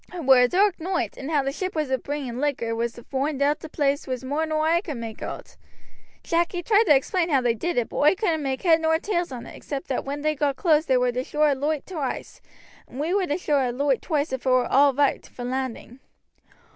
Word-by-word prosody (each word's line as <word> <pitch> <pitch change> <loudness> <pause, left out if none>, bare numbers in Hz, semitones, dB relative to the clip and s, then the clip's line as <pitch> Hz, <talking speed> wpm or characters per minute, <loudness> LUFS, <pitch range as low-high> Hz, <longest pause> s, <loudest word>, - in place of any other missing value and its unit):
It 350 -4 -6
were 265 -1 +7
a 250 - +5
dark 385 +6 +2
noight, 360 +2 -2
and 270 - -7
how 295 -3 +2
the 275 - -1
ship 370 +3 -4
as 305 -3 -1
was 260 -1 0
bringing 280 -3 -4
the - - -4
liquor 240 -6 -1
was 235 0 -2
to 240 - -12
foind 275 +2 -2
oot 290 +2 +2
the 320 - -9
place 285 -1 0
was 255 -1 -4
more 290 +5 -1
nor 310 0 0
oi 340 +1 +3
could 305 -9 -6
make 225 -2 -7
oot. - - -7 0.7
Jack 340 +2 0
he 355 -1 -3
tried 435 +4 +4
to 295 - +6
explain 335 +6 0
how 280 -4 +4
they 245 -2 +1
did 335 +9 -3
it, 240 - 0
but - - -7
oi 300 +6 +4
couldn't 345 -6 0
make 270 -2 -3
head 330 -3 +4
nor 320 0 +3
tails 350 -2 -2
on 245 -2 -7
it - - -11
except 275 -2 -6
that 260 - -1
when 285 +1 -5
they 305 0 +2
got 285 -2 0
close 315 0 +2
they 260 - +3
war 250 0 +2
to 250 +1 -2
show 300 +3 -1
a 295 -1 +4
loight 290 +2 -2
twice, 305 -8 -5 0.5
and 260 - -10
we 320 +5 -1
war 390 -2 +1
to 290 - 0
show 300 -5 +1
a 255 -2 +1
loight 270 +1 0
twice 295 -4 -1
if 260 - -3
it - - +4
war 255 -1 +4
all 280 +3 +4
roight 285 +1 0
for 245 - -9
landing. 255 -1 -4
290 Hz, 260 wpm, -24 LUFS, 260-320 Hz, 0.7 s, were